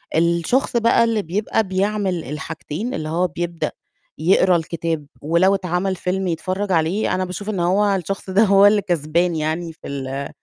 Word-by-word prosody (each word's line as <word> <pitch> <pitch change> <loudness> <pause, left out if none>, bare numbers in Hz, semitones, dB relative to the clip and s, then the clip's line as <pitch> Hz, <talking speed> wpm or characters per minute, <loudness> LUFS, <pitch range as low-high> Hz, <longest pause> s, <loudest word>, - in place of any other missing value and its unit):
الشخص 170 +11 +1
بقى 230 0 +4
اللي 225 -2 +1
بيبقى 205 +5 -1
بيعمل 190 -2 -1
الحاجتين 160 - -5
اللي 155 -10 -4
هو 175 +3 +1
بيبدأ 170 0 -3 0.5
يقرا 180 +3 +4
الكتاب 165 -2 -2 0.2
ولو 170 +6 +3
اتعمل 185 0 -1
فيلم 185 +1 -2
يتفرّج 185 +4 -2
عليه، 170 +5 +1
أنا 185 0 -1
باشوف 185 +3 -6
إن 200 -4 -2
هو 195 +4 +2
الشخص 195 +2 -4
ده 195 +4 +4
هو 200 -1 +6
اللي 205 0 +5
كسبان 170 -1 0
يعني 160 +2 -2
في - - -12
ال 135 0 -4
180 Hz, 160 wpm, -21 LUFS, 165-195 Hz, 0.5 s, هو